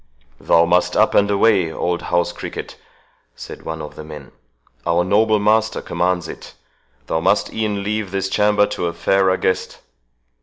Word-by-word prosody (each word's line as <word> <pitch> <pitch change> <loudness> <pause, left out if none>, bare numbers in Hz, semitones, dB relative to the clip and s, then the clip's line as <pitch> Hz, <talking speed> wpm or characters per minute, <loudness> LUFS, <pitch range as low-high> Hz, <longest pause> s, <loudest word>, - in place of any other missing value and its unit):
"Thou 85 0 +3
must 90 +1 +1
up - - +3
and 100 0 +3
away, 100 -4 +3
old 85 +1 -2
house 85 0 0
cricket," - - -7 0.6
said - - -10
one 80 -1 -6
of 75 - -8
the 75 - -9
men; 75 -3 -11 0.5
"our 85 +4 +1
noble 110 +4 +3
master 110 +2 +1
commands 90 -2 -1
it—Thou 80 - -8
must 95 +5 +1
e'en 105 -2 -2
leave 105 -1 -2
this 95 0 -2
chamber 105 +1 +3
to 100 -4 -3
a 85 - -3
fairer 95 +2 +2
guest." 95 - -2
95 Hz, 155 wpm, -19 LUFS, 85-105 Hz, 0.6 s, Thou